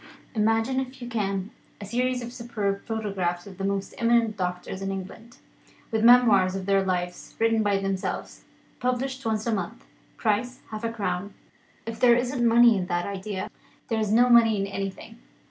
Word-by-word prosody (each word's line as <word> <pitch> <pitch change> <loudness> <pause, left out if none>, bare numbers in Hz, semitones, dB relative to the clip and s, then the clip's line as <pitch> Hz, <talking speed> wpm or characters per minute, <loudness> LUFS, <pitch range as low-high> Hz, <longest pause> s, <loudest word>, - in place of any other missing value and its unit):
Imagine 225 +4 +1
(if 260 0 -5
you 240 - -7
can) 200 -4 -2 0.3
a 205 - -7
series 250 +4 -1
of 240 0 -7
superb 215 -5 -3
photographs 195 -6 -2
of 195 -2 -12
the - - -3
most 195 0 -2
eminent 230 -2 +3
doctors 180 0 -4
in 195 - -2
England, 195 +5 -8 0.5
with 220 -1 0
memoirs 220 -6 +6
of 190 -1 -4
their 195 0 +3
lives 180 -1 -3
written 225 0 +2
by 205 -2 +2
themselves; 195 -1 -3 0.4
published 260 +2 -2
once 220 -1 -1
a 230 - 0
month, 175 - -4 0.3
price 245 +4 -1
half 215 +1 -6
a 230 - -1
crown. 200 -2 -3 0.5
If 225 0 -6
there 240 0 +6
isn't 245 +1 -1
money 235 0 +6
in 185 -2 -2
that 175 -1 -1
idea, 195 -1 -5 0.4
there 225 - 0
is 215 -2 0
no 240 +3 +5
money 230 -3 +5
in 195 - 0
anything. 195 - -6
215 Hz, 175 wpm, -26 LUFS, 195-235 Hz, 0.5 s, memoirs